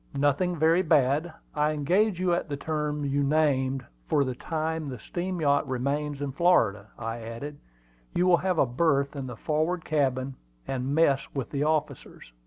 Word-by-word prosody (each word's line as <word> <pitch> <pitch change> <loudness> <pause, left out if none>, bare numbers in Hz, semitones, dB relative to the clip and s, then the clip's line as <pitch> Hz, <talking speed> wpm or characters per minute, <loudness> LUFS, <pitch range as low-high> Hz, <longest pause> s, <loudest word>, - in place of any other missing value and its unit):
"Nothing 145 +6 +2
very 165 +3 +4
bad. 150 0 +2 0.2
I 150 0 +1
engage 180 +7 +1
you 180 -1 +2
at 170 - -1
the 145 - -3
terms 150 -1 -2
you 145 - +2
named 135 -3 +1 0.2
for 145 - +3
the 130 -2 -2
time 160 +2 -3
the 125 - -5
steam 180 - -4
yacht 145 -1 +2
remains 140 +3 -2
in 140 - -2
Florida," 115 - +2
I 115 0 -4
added. 115 +6 -7 0.6
"You 180 - +3
will 180 -1 +6
have 185 -1 -1
a - - +5
berth 140 +2 +1
in 135 -2 -4
the 125 -2 -7
forward 160 +5 -1
cabin, 135 -3 0 0.3
and 135 +1 -2
mess 140 -4 +3
with 135 -3 -3
the 140 - -2
officers." 150 - -3
145 Hz, 175 wpm, -27 LUFS, 135-160 Hz, 0.6 s, will